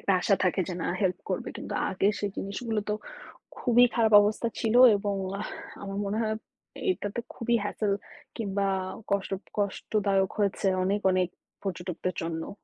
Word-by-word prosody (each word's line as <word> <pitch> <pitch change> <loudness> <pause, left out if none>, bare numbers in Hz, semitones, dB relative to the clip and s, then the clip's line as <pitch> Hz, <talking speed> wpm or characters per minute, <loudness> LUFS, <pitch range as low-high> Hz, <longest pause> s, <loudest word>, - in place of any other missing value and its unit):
একটা 200 - +1
আশা 195 - +4
থাকে 185 +1 +2
যে, 180 - -3
"না, - - -1
হেল্প 185 -2 +1
করবে।" - - -2
কিন্তু - - -6 0.2
আগে 195 +1 +2
সেই 205 -1 -1
জিনিসগুলো 210 +2 -2
তো - - +2 0.6
খুবই 245 0 +5
খারাপ 225 -2 +3
অবস্থা 215 +3 +1
ছিল 225 -1 +1 0.2
এবং 200 0 -2 0.2
আহ 215 - -3 0.4
আমার 195 0 -5
মনে 205 +2 -1
হয় 220 -1 0 0.5
এইটাতে 210 - -1 0.2
খুবই 235 0 +1
hassel 205 0 -1 0.5
কিংবা 200 -2 0 0.4
কষ্ট 200 -1 0 0.3
কষ্টদায়ক 200 -1 +1
হয়েছে 200 0 +1 0.2
অনেক 200 +2 +1
অনেক 185 -1 +2 0.4
পর্যটকদের 185 -1 -3
জন্য। 165 +3 -4
200 Hz, 150 wpm, -28 LUFS, 190-215 Hz, 0.6 s, খুবই